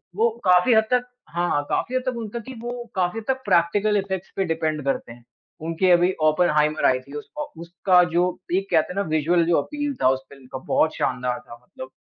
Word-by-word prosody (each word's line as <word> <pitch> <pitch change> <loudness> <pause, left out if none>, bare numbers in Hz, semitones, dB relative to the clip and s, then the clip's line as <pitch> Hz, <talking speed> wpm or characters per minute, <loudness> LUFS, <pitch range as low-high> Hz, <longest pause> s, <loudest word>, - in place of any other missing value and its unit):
वो 230 +2 +3 0.2
काफ़ी 180 +6 +5
हद 220 - +5
तक 250 0 +2 0.2
हाँ, 175 +2 -1
हाँ। 145 - +2
काफ़ी 255 - -1
हद 255 - +1
तक 250 -2 -2
उनका 230 +1 -5
कि 260 +4 -9
वो 240 0 -5
काफ़ी 185 +4 0
हद 220 - -11
तक 265 0 0
प्रैक्टिकल 205 +5 +2
इफ़ेक्ट्स 190 -1 -3
पे 195 - +1
डिपेंड 160 -2 -1
करते 135 -3 -2
हैं। 120 0 -14 0.4
उनकी 165 +3 +1
अभी 175 +1 +5
ओपनहाइमर 155 -1 +2
आयी 130 0 +4
थी 140 +2 -15
उसको 295 - -7
उसका 180 +1 +3
जो 180 +1 +2 0.2
पीक 195 +3 -1
कहते 165 +2 +2
हैं - - -14
ना 200 - +1
विज़ुअल 165 +3 +2
जो 170 -1 +3
अपील 290 - -4
था 130 - +6
उस 130 - +1
फ़िल्म 135 -2 -15
का - - -4 0.2
बहुत 155 - +2
शानदार 125 -1 -1
था 120 - -13
मतलब। 130 +1 -10
175 Hz, 220 wpm, -23 LUFS, 155-215 Hz, 0.4 s, था